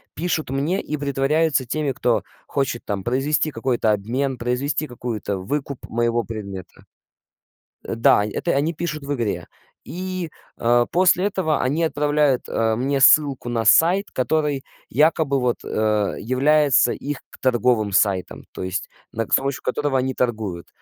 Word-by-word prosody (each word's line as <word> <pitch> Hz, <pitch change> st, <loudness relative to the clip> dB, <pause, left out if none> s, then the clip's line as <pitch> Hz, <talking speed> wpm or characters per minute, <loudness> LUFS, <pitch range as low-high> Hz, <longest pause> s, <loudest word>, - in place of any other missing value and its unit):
пишут 160 Hz, -2 st, -2 dB
мне 145 Hz, +9 st, 0 dB
и 150 Hz, -, -4 dB
притворяются 140 Hz, +1 st, +1 dB
теми, 145 Hz, +3 st, -1 dB
кто 120 Hz, -3 st, +1 dB, 0.2 s
хочет 135 Hz, -4 st, -2 dB
там 100 Hz, -2 st, -3 dB
произвести 145 Hz, +5 st, +1 dB
какой-то 120 Hz, -3 st, 0 dB
обмен, 125 Hz, +6 st, -2 dB
произвести 135 Hz, +5 st, -1 dB
какую-то 115 Hz, -5 st, -4 dB
выкуп 140 Hz, +7 st, -4 dB
моего 120 Hz, 0 st, 0 dB
предмета. 100 Hz, -5 st, -8 dB, 1.0 s
Э, -, -, -3 dB
да, 115 Hz, -2 st, +4 dB
это 110 Hz, +10 st, -2 dB
они 150 Hz, +3 st, +1 dB
пишут 155 Hz, -2 st, -4 dB
в 140 Hz, +1 st, -2 dB
игре. 115 Hz, -6 st, -2 dB, 0.4 s
И, 185 Hz, -1 st, -4 dB, 0.3 s
а, 120 Hz, +1 st, +3 dB
после 180 Hz, +1 st, +3 dB
этого 185 Hz, -7 st, 0 dB
они 150 Hz, +6 st, 0 dB
отправляют, 145 Hz, -3 st, +1 dB
а, 110 Hz, -1 st, +1 dB
мне 135 Hz, +4 st, 0 dB
ссылку 140 Hz, -2 st, +5 dB
на 115 Hz, -2 st, -1 dB
сайт, 175 Hz, -, +5 dB
который 145 Hz, +1 st, 0 dB, 0.3 s
якобы 150 Hz, -2 st, +2 dB
вот, 125 Hz, -2 st, 0 dB
а, 105 Hz, -2 st, 0 dB
является 140 Hz, +4 st, +3 dB
их 145 Hz, -1 st, -4 dB, 0.2 s
торговым 120 Hz, -4 st, +2 dB
сайтом, 95 Hz, -1 st, +1 dB
то -, -, -8 dB
есть 95 Hz, +1 st, -3 dB, 0.2 s
на 115 Hz, +1 st, -2 dB
к -, -, -20 dB
с -, -, +9 dB
помощью 135 Hz, 0 st, -3 dB
которого 135 Hz, +2 st, 0 dB
они 130 Hz, 0 st, 0 dB
торгуют. 110 Hz, -9 st, -2 dB
135 Hz, 145 wpm, -22 LUFS, 115-150 Hz, 1.0 s, с